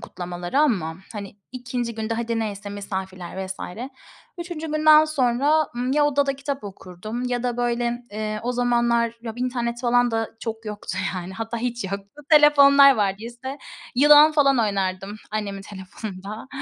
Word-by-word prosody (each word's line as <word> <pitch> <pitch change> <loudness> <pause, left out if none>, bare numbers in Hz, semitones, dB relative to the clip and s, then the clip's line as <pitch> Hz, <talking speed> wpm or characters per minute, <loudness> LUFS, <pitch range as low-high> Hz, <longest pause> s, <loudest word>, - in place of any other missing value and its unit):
kutlamalara 175 +7 -3
ama, 180 - +1 0.2
hani, 205 -2 -8 0.2
2. 245 -2 -4
günde 220 +1 -3
hadi 230 0 -2
neyse 205 -2 -4
misafirler 190 -2 -6
vs. 190 - -5 0.8
3. 340 -2 -5
günden 310 0 +6
sonra, 290 +1 +2
ımm, 250 +2 -1
ya 295 0 +3
odada 285 -1 +1
kitap 275 -2 -4
okurdum 200 +4 -7
ya 245 -1 -1
da 245 -1 -2
böyle, 240 0 -1
eee, 215 0 -4
o 245 +1 -1
zamanlar 235 -1 +1
ya 225 - -5
internet 245 -1 -2
falan 245 -1 +3
da 225 0 -1
çok 225 0 -5
yoktu 210 -3 -5 0.2
yani. 185 +1 -6
Hatta 225 +2 -4
hiç 240 -1 -3
yoktu. 200 +9 -7
Telefonlar 280 -2 +7
vardıysa 235 +7 -3 0.4
yılan 295 +3 +7
falan 275 -4 +3
oynardım, 195 -1 -1
annemin 200 -2 -4
telefonunda. 200 +3 -8
235 Hz, 145 wpm, -23 LUFS, 205-265 Hz, 0.8 s, Telefonlar